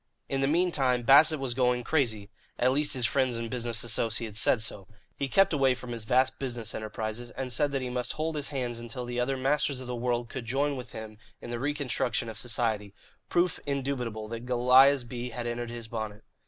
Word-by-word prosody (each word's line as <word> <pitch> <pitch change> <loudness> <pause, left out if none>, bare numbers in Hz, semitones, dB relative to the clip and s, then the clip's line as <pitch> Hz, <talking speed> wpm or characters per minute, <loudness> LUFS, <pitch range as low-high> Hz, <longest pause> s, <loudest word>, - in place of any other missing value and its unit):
In 135 0 -1
the 135 - +2
meantime, 140 -7 +2
Bassett 150 +4 +6
was 135 -3 -2
going 125 -1 +1
crazy 110 -8 0 0.3
at 125 +1 +3
least 145 +1 +2
his 125 -2 +2
friends 130 -1 +1
and 115 0 -4
business 120 -2 0
associates 115 -1 0
said 110 -1 +4
so. 100 -4 -2 0.3
He 140 - -2
kept 195 +6 +4
away 135 -3 +3
from 125 -1 -8
his 115 -2 -4
vast 130 +3 +2
business 120 -4 -3
enterprises 110 +2 -5
and 130 -1 -5
said 145 +4 +1
that 135 -2 -1
he 125 - -3
must 125 0 -1
hold 155 +1 -2
his 145 -2 -1
hands 125 -4 -3
until 120 +2 -6
the 120 0 -3
other 135 +2 0
masters 140 +1 +1
of 130 - -6
the 125 0 -4
world 120 0 -1
could 115 +1 -6
join 140 +4 0
with 125 -2 -8
him 110 -1 -8 0.2
in 120 - -8
the 120 - -3
reconstruction 135 -4 -1
of 110 -1 -5
society 110 -4 -1 0.3
proof 175 -1 +1
indubitable 125 -6 -2
that 115 +1 -6
Goliah's 125 +2 +5
bee 120 0 -5
had 120 0 -5
entered 120 0 -3
his 115 -1 -7
bonnet. 110 -2 -5
125 Hz, 210 wpm, -28 LUFS, 115-135 Hz, 0.3 s, Bassett